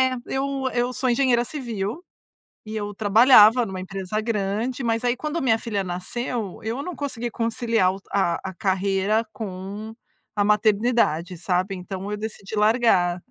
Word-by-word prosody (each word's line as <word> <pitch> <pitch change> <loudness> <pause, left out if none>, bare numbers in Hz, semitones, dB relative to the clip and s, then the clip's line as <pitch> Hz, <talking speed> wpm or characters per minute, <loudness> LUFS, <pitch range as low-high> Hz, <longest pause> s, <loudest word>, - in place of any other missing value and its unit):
é - - -5
eu 270 0 -2
eu 245 +1 0
sou 255 0 0
engenheira 240 -1 +3
civil, 235 - -4 0.6
e 215 +1 -5
eu 205 -1 -4
trabalhava 220 +2 +6
numa 190 -3 -5
empresa 195 +2 -4
grande, 220 +3 -2
mas 230 0 0
aí 245 0 +2
quando 305 +5 -3
a - - -2
minha 230 -5 +2
filha 210 -4 -2
nasceu, 195 +4 -4
eu 230 +5 -3
não 355 +3 -5
consegui 245 -5 -4
conciliar 230 -4 +1
o 195 - -9
t - - -29
a 175 -4 +1
a - - -10
carreira 195 +2 +1
com 205 +1 -6 0.4
a 205 - +2
maternidade, 210 -4 +2
sabe. 185 +2 0
Então 190 +2 -6
eu 210 - -2
decidi 215 -1 -6
largar 210 -5 +3
215 Hz, 160 wpm, -24 LUFS, 195-240 Hz, 0.6 s, trabalhava